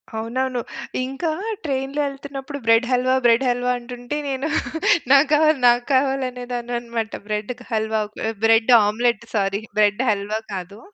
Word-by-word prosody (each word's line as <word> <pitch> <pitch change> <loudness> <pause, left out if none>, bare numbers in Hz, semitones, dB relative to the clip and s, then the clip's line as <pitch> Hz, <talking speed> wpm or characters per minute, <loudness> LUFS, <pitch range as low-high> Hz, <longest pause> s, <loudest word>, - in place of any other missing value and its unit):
అవునవును. 250 +3 -2 0.5
ఇంకా 270 +6 -3 0.3
ట్రైన్‌లో 275 0 -2
ఎళ్తున్నప్పుడు, 275 0 -7
"బ్రెడ్ 230 +2 +4
హల్వా, 255 +1 +2
బ్రెడ్ 240 +2 +4
హల్వా" 245 +1 0
అంటుంటే 245 +3 -6
నేను 270 +2 -2 0.6
నాకావాలి, 300 +1 +5
నాకావాలి 265 +2 +2
అనేదానన్నమాట. 240 -2 -4 0.2
Bread 210 +2 -2 0.2
halwa, 220 0 0 0.4
bread 225 +2 +4
omelette. 230 +1 0
Sorry, 195 0 0 0.2
bread 210 +2 +3
halwa 210 +1 -1
కాదు, 195 +2 -7
245 Hz, 115 wpm, -22 LUFS, 220-270 Hz, 0.6 s, నాకావాలి